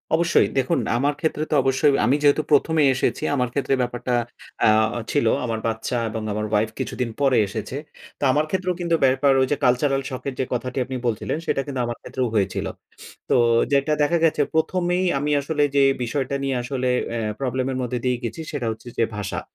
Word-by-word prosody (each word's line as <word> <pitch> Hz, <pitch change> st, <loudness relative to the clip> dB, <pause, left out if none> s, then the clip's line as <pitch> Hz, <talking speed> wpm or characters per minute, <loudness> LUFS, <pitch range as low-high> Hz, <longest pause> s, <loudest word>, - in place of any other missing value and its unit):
অবশ্যই 170 Hz, +1 st, +3 dB
দেখুন 130 Hz, -, +1 dB, 0.2 s
আমার 140 Hz, +4 st, +1 dB
ক্ষেত্রে 155 Hz, -1 st, -1 dB
তো -, -, +3 dB
অবশ্যই 135 Hz, +2 st, +3 dB
আমি 130 Hz, +5 st, +3 dB
যেহেতু 145 Hz, +1 st, +4 dB
১ম 150 Hz, +2 st, +3 dB
এ -, -, +5 dB
এসেছি 130 Hz, -, -1 dB
আমার 125 Hz, -3 st, 0 dB
ক্ষেত্রে 140 Hz, -1 st, 0 dB
ব্যাপারটা 125 Hz, 0 st, -2 dB, 0.5 s
আ -, -, +6 dB, 0.4 s
ছিল 145 Hz, -5 st, +1 dB, 0.2 s
আমার 115 Hz, -2 st, -2 dB
বাচ্চা 115 Hz, +2 st, -2 dB
এবং 110 Hz, 0 st, -4 dB
আমার 105 Hz, +1 st, -2 dB
ওয়াইফ 105 Hz, +1 st, +2 dB
কিছুদিন 125 Hz, -2 st, -2 dB
পরে 135 Hz, -2 st, +4 dB
এসেছে। 110 Hz, +6 st, -5 dB, 0.4 s
তো -, -, -5 dB
আমার 150 Hz, +3 st, +2 dB
ক্ষেত্রেও 185 Hz, 0 st, -1 dB
কিন্তু 170 Hz, -1 st, +1 dB
ব্যাপার 135 Hz, +1 st, +3 dB
ওই 130 Hz, -, +2 dB
যে 145 Hz, -, +2 dB
কালচারাল 135 Hz, +2 st, +2 dB
শক 130 Hz, -2 st, -6 dB
এর 135 Hz, -, -2 dB
যে 130 Hz, -, +1 dB
কথাটি 125 Hz, +2 st, -3 dB
আপনি 130 Hz, -, -6 dB
বলছিলেন 115 Hz, +5 st, -2 dB
সেটা 135 Hz, -, 0 dB
কিন্তু 135 Hz, -3 st, -4 dB
আমার 120 Hz, 0 st, -4 dB
ক্ষেত্রেও 130 Hz, -1 st, -2 dB
হয়েছিল। 100 Hz, -3 st, 0 dB, 0.6 s
তো -, -, +3 dB, 0.4 s
যেটা 140 Hz, +2 st, +2 dB
দেখা 170 Hz, +4 st, +2 dB
গেছে 155 Hz, -2 st, +2 dB
১ম 165 Hz, +3 st, +1 dB
এই 185 Hz, -, +1 dB
আমি 145 Hz, +1 st, -1 dB
আসলে 150 Hz, +1 st, 0 dB
যেই 135 Hz, -1 st, +5 dB
বিষয়টা 135 Hz, +2 st, -2 dB
নিয়ে 135 Hz, -1 st, 0 dB
আসলে 130 Hz, 0 st, -2 dB, 0.2 s
অ্যা 115 Hz, -1 st, -2 dB, 0.2 s
প্রবলেম 130 Hz, -1 st, -1 dB
এর 130 Hz, -, -3 dB
মধ্যে 125 Hz, 0 st, -2 dB
দিয়েই 125 Hz, -1 st, 0 dB
গেছি 120 Hz, +7 st, -4 dB
সেটা 135 Hz, -6 st, -3 dB
হচ্ছে 110 Hz, +2 st, -10 dB
যে 115 Hz, -, +3 dB
ভাষা। 100 Hz, -3 st, -3 dB
130 Hz, 200 wpm, -23 LUFS, 120-145 Hz, 0.6 s, আ